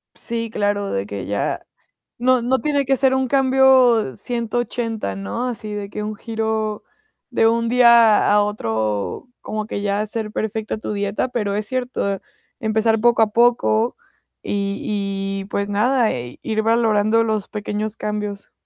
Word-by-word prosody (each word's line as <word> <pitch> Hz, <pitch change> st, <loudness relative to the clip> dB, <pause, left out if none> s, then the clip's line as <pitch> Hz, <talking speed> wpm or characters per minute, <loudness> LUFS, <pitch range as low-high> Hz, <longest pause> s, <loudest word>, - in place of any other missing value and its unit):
Sí, 230 Hz, -1 st, -3 dB
claro, 205 Hz, -2 st, -1 dB
de 95 Hz, 0 st, -1 dB
que 100 Hz, -2 st, -6 dB
ya 100 Hz, 0 st, -2 dB, 0.6 s
no, 255 Hz, 0 st, +3 dB
no 260 Hz, +2 st, +1 dB
tiene 285 Hz, -2 st, +1 dB
que 270 Hz, +1 st, +2 dB
ser 265 Hz, 0 st, +3 dB
un 265 Hz, 0 st, +1 dB
cambio 260 Hz, -, +4 dB
180, 230 Hz, -, -3 dB
¿no? 100 Hz, -, -3 dB
Así 215 Hz, -3 st, -5 dB
de 205 Hz, -1 st, -4 dB
que 210 Hz, -, -5 dB
un 215 Hz, +1 st, -4 dB
giro 220 Hz, -1 st, -3 dB, 0.5 s
de 225 Hz, -, +3 dB
un 230 Hz, 0 st, +1 dB
día 235 Hz, -3 st, +6 dB
a 210 Hz, 0 st, +5 dB
otro, 110 Hz, -, -2 dB
como 215 Hz, 0 st, -4 dB
que 200 Hz, -2 st, -4 dB
ya 200 Hz, 0 st, 0 dB
hacer 215 Hz, 0 st, -3 dB
perfecta 220 Hz, 0 st, -3 dB
tu 215 Hz, -, -5 dB
dieta, 205 Hz, +4 st, -1 dB
pero 210 Hz, -5 st, -2 dB
es 210 Hz, 0 st, -2 dB
cierto, 245 Hz, -6 st, -2 dB, 0.4 s
empezar 220 Hz, 0 st, +1 dB
poco 235 Hz, 0 st, +4 dB
a 215 Hz, -, +3 dB
poco 235 Hz, -1 st, +3 dB, 0.5 s
y 200 Hz, 0 st, -2 dB, 0.6 s
y -, -, -9 dB
pues, 200 Hz, 0 st, -2 dB
nada, 230 Hz, +3 st, +2 dB
e 120 Hz, 0 st, -6 dB
ir 220 Hz, -1 st, -1 dB
valorando 225 Hz, -1 st, +3 dB
los 215 Hz, -3 st, -1 dB
pequeños 210 Hz, +1 st, -4 dB
cambios. 210 Hz, -1 st, -4 dB
220 Hz, 155 wpm, -21 LUFS, 205-235 Hz, 0.6 s, día